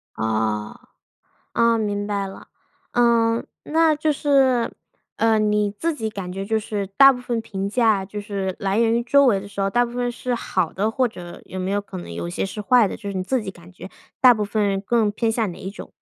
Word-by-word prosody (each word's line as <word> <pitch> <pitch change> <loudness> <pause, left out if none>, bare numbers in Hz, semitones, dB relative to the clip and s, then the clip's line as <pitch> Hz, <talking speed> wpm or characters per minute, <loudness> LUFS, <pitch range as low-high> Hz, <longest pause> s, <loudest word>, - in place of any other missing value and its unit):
哦， 110 -1 -1 0.8
啊， 230 -1 +3
明 205 -1 -2
白 200 -1 -2
了。 195 - -11 0.4
嗯， 235 -1 +2 0.2
那 320 0 +3
就 305 0 +1
是， 270 -4 +2 0.5
呃， 225 -1 +3
你 210 -1 +1
自 330 -1 0
己 220 -5 -3
感 190 -4 -6
觉 195 +1 -4
就 220 +2 0
是 205 -2 -3
大 275 +8 +6
部 250 - -7
分 240 -2 -2
评 195 -2 -4
价， 215 -4 +2
就 205 +2 -6
是 195 -2 -3
来 195 +2 0
源 230 -1 +3
于 235 - +1
周 280 +3 +4
围 200 -5 +3
的 200 - -10
时 200 0 -6
候， 195 0 +1
大 245 +2 +3
部 240 - -7
分 245 0 -1
是 250 0 -3
好 185 -7 -1
的， 210 +3 0
或 255 +1 +1
者 175 -5 -10
有 185 - -7
没 185 +1 -2
有 205 0 +1
可 200 -2 -10
能 130 - -8
有 85 0 -4
一 - - -5
些 - - -2
是 205 +2 -5
坏 235 +1 +4
的？ - - -5
就 200 -2 -6
是 - - -6
你 185 - -1
自 255 +6 0
己 195 - -5
感 175 -1 -16
觉 180 - -10 0.3
大 250 -1 +8
部 210 -1 -1
分 200 -2 0
更 220 0 +1
偏 225 +2 -1
向 220 -4 0
哪 - - -11
一 190 - -6
种？ - - -10
210 Hz, 250 characters per minute, -22 LUFS, 195-235 Hz, 0.8 s, 大